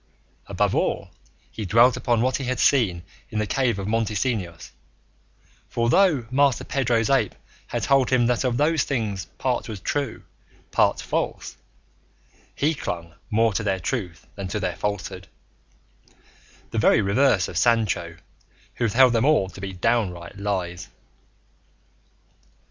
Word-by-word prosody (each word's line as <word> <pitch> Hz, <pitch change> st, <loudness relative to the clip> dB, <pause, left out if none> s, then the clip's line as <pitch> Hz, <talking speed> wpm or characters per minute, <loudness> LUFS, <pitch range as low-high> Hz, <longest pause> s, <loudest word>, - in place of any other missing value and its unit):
Above -, -, 0 dB
all, -, -, -1 dB, 0.4 s
he 110 Hz, -, -6 dB
dwelt 115 Hz, +5 st, +5 dB
upon 120 Hz, -1 st, +1 dB
what 130 Hz, 0 st, +1 dB
he 135 Hz, -, -5 dB
had 125 Hz, -1 st, -2 dB
seen 95 Hz, -11 st, +2 dB, 0.3 s
in 110 Hz, -, -5 dB
the 105 Hz, -, +1 dB
cave 120 Hz, -1 st, 0 dB
of 100 Hz, 0 st, -4 dB
Montesinos; 110 Hz, -5 st, -2 dB, 1.0 s
for 115 Hz, 0 st, 0 dB
though 160 Hz, -8 st, +3 dB
Master 140 Hz, -1 st, +2 dB
Pedro's 120 Hz, -5 st, 0 dB
ape 125 Hz, -7 st, +2 dB, 0.3 s
had -, -, -3 dB
told 135 Hz, -2 st, +3 dB
him 125 Hz, -2 st, +3 dB
that 120 Hz, +1 st, +1 dB
of 125 Hz, -2 st, 0 dB
those 155 Hz, +2 st, +2 dB
things 105 Hz, -8 st, -2 dB
part 125 Hz, -2 st, -1 dB
was 105 Hz, -3 st, -6 dB
true, 140 Hz, +5 st, -3 dB, 0.5 s
part -, -, +2 dB
false, -, -, -3 dB, 1.0 s
he 150 Hz, +3 st, +1 dB
clung 85 Hz, -, -5 dB, 0.2 s
more 110 Hz, 0 st, +2 dB
to 105 Hz, -, -1 dB
their 95 Hz, -3 st, -1 dB
truth 90 Hz, -3 st, -4 dB
than 100 Hz, -2 st, -6 dB
to 95 Hz, +3 st, -3 dB
their 90 Hz, -4 st, -2 dB
falsehood, 95 Hz, -2 st, -4 dB, 1.4 s
the -, -, -1 dB
very -, -, +4 dB
reverse 100 Hz, -1 st, +2 dB
of -, -, -9 dB
Sancho, 90 Hz, -5 st, +1 dB, 0.6 s
who 120 Hz, -, +1 dB
held 125 Hz, +3 st, +5 dB
them 115 Hz, 0 st, +2 dB
all 140 Hz, -10 st, +3 dB
to 95 Hz, -, -12 dB
be 100 Hz, -1 st, -4 dB
downright 95 Hz, -3 st, -1 dB
lies. 95 Hz, -3 st, -3 dB
115 Hz, 145 wpm, -24 LUFS, 95-125 Hz, 1.4 s, dwelt